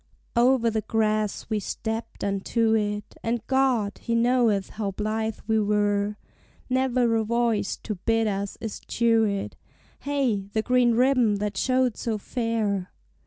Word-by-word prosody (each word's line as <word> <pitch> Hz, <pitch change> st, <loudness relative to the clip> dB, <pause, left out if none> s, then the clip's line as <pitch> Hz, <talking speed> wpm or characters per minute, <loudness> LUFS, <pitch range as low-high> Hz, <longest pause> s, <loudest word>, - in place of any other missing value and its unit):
Over 240 Hz, -1 st, +4 dB
the 220 Hz, 0 st, -1 dB
grass 215 Hz, -1 st, 0 dB
we 215 Hz, -1 st, 0 dB
stepped 225 Hz, +3 st, -5 dB
unto 220 Hz, +3 st, +1 dB
it, 210 Hz, -1 st, -1 dB
And 230 Hz, -1 st, -2 dB
God, 255 Hz, -7 st, +1 dB
He 235 Hz, -, -2 dB
knoweth 230 Hz, -4 st, +2 dB
how 210 Hz, -2 st, -3 dB
blithe 215 Hz, +2 st, -2 dB
we 220 Hz, 0 st, +2 dB
were! 205 Hz, 0 st, +1 dB, 0.5 s
Never 255 Hz, -2 st, +2 dB
a 220 Hz, -, +1 dB
voice 230 Hz, -2 st, 0 dB
to 215 Hz, -, -3 dB
bid 225 Hz, +4 st, 0 dB
us 200 Hz, -1 st, -2 dB
eschew 230 Hz, 0 st, +1 dB
it; 200 Hz, -1 st, -3 dB, 0.4 s
Hey 260 Hz, -9 st, -1 dB
the 220 Hz, -, +1 dB
green 250 Hz, -1 st, +3 dB
ribbon 250 Hz, -3 st, +3 dB
that 205 Hz, 0 st, -3 dB
showed 255 Hz, +2 st, +1 dB
so 225 Hz, -2 st, -2 dB
fair! 215 Hz, -4 st, -2 dB
220 Hz, 140 wpm, -25 LUFS, 210-235 Hz, 0.5 s, Over